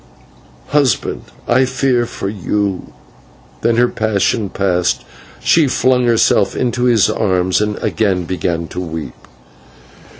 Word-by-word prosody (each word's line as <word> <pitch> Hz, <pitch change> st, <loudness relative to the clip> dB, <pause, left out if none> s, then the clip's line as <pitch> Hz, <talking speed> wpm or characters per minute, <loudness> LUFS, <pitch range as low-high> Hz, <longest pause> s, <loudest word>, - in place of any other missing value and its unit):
Husband, 145 Hz, -3 st, +1 dB, 0.3 s
I 130 Hz, +2 st, +4 dB
fear 130 Hz, -2 st, 0 dB
for 100 Hz, -, -5 dB
you 100 Hz, -1 st, -2 dB, 0.3 s
" -, -, -28 dB
Then, 115 Hz, -, +2 dB
her 120 Hz, +1 st, +4 dB
passion 110 Hz, -1 st, 0 dB
past, 90 Hz, -3 st, 0 dB, 0.4 s
she 160 Hz, -3 st, +4 dB
flung 130 Hz, -1 st, +2 dB
herself 110 Hz, -4 st, +2 dB
into 125 Hz, 0 st, 0 dB
his 115 Hz, -5 st, +4 dB
arms 95 Hz, -3 st, +1 dB
and 105 Hz, -1 st, -1 dB
again 95 Hz, -5 st, 0 dB
began 85 Hz, -1 st, -2 dB
to -, -, -6 dB
weep. 80 Hz, -7 st, -5 dB
105 Hz, 125 wpm, -16 LUFS, 90-120 Hz, 0.4 s, I